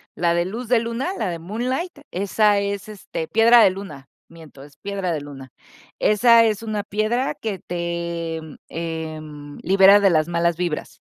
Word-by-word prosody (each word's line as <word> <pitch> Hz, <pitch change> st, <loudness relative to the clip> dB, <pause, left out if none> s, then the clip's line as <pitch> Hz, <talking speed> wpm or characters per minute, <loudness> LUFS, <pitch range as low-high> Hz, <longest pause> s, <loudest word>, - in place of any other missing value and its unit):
la 170 Hz, 0 st, +1 dB
de 170 Hz, 0 st, +1 dB
luz 225 Hz, +6 st, -6 dB
de 245 Hz, 0 st, +3 dB
luna, 235 Hz, +7 st, -3 dB
la 215 Hz, -, -1 dB
de 170 Hz, -, -4 dB
Moonlight, 255 Hz, -, -4 dB
esa 205 Hz, +2 st, +2 dB
es, 200 Hz, 0 st, -4 dB
este, 195 Hz, -5 st, -6 dB
piedra 230 Hz, +4 st, +6 dB
de -, -, +6 dB
luna. 185 Hz, -8 st, -9 dB, 0.2 s
Miento, 160 Hz, -4 st, -14 dB
es 145 Hz, -1 st, -18 dB
piedra 195 Hz, -3 st, -3 dB
de 155 Hz, -, -3 dB
Luna. 135 Hz, -3 st, -11 dB, 0.5 s
Esa 230 Hz, +2 st, +5 dB
es 215 Hz, -2 st, 0 dB
una 215 Hz, -2 st, -3 dB
piedra 215 Hz, +5 st, -1 dB
que 210 Hz, -4 st, -5 dB
te 170 Hz, -1 st, -4 dB, 0.3 s
em, 155 Hz, -3 st, -6 dB
libera 195 Hz, +2 st, +6 dB
de 200 Hz, -, +5 dB
las 155 Hz, -3 st, +2 dB
malas 170 Hz, -1 st, 0 dB
vibras. 175 Hz, -4 st, -4 dB
190 Hz, 165 wpm, -22 LUFS, 165-215 Hz, 0.5 s, piedra